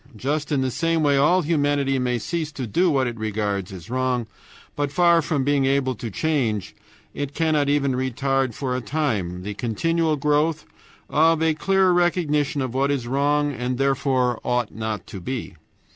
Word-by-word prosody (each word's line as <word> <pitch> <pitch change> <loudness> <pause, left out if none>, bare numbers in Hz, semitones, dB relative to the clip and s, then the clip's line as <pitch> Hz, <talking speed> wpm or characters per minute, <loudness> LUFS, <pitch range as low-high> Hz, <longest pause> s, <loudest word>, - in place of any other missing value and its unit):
Just 145 +6 -2
in 140 -3 +2
the 130 -1 0
same 165 +3 0
way 145 -1 +3
all 165 +7 +4
humanity 145 -3 +1
may 125 -1 0
cease 160 +6 -3
to 130 - -4
do 175 - +2
what 135 -4 +2
it 120 -2 -4
regards 105 -3 -2
as 95 +4 -10
wrong, 130 -2 0 0.5
but 145 -1 -1
far 170 +2 +4
from 150 -3 -1
being 140 0 +2
able 135 -1 +1
to 115 0 -6
change, 115 - -1 0.4
it 145 +1 -5
cannot 155 -3 +1
even 140 -1 +2
retard 130 -1 -1
for 130 -3 -2
a 130 - -2
time 105 - -2
the 105 +2 -4
continual 160 +9 0
growth 150 +2 +1 0.4
of 160 +1 +3
a 160 -1 +3
clearer 190 +3 +2
recognition 155 -5 +1
of 130 -2 -4
what 135 +2 +1
is 140 -4 -1
wrong 145 +3 +1
and 125 0 -3
therefore 130 -3 +1
ought 125 -2 -1
not 110 -3 -4
to 95 - -8
be. 125 +6 -5
140 Hz, 175 wpm, -23 LUFS, 125-150 Hz, 0.5 s, all